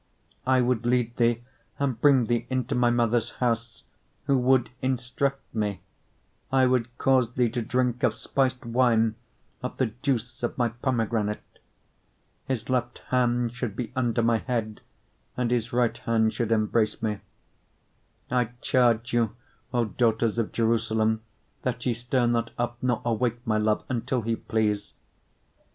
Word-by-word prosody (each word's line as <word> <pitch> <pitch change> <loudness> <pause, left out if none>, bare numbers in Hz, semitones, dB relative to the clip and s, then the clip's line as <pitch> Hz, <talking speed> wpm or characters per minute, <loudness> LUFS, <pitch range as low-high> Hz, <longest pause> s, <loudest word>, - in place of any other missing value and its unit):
8:2 - - +3
I 130 - +5
would 120 -2 +1
lead 120 -1 +1
thee, 120 0 +2 0.3
and 130 -5 -1
bring 135 -4 +5
thee 120 0 0
into 130 +1 -1
my 125 -1 +3
mother's 120 -1 +1
house, 115 -2 -2 0.4
who 140 - +3
would 130 -1 +3
instruct 130 +2 -2
me: 105 -4 -2 0.7
I 130 -1 +4
would 125 -1 0
cause 130 -3 +3
thee 125 -2 +2
to 120 - -2
drink 125 +1 0
of 130 - +2
spiced 130 -2 -1
wine 115 -2 +3 0.5
of 125 - -5
the 120 -5 0
juice 125 -4 -1
of 120 - -2
my 120 -2 +2
pomegranate. 115 -3 -1
8:3 - - -35 0.9
His 130 -3 -2
left 120 -1 0
hand 120 -2 +1
should 120 -5 -4
be 125 - -4
under 120 -2 +1
my 115 -1 +3
head, 110 -4 -3 0.6
and 125 -1 0
his 120 -1 0
right 120 -1 +1
hand 110 -1 +1
should 115 -2 -2
embrace 110 0 +1
me. 105 -2 -1 1.1
8:4 125 - +2
I 125 - +3
charge 120 -3 +2
you, 115 -2 +1 0.4
O 120 -2 +2
daughters 115 +1 +1
of 115 - -1
Jerusalem, 110 -1 +1 0.4
that 120 -2 -3
ye 125 - +2
stir 120 +1 0
not 115 -1 +1
up, 120 0 -2
nor 125 -1 0
awake 120 +1 0
my 110 -1 +1
love, 105 0 +1
until 125 0 -1
he 115 +1 0
please. 110 -3 -1
120 Hz, 155 wpm, -26 LUFS, 115-125 Hz, 1.1 s, I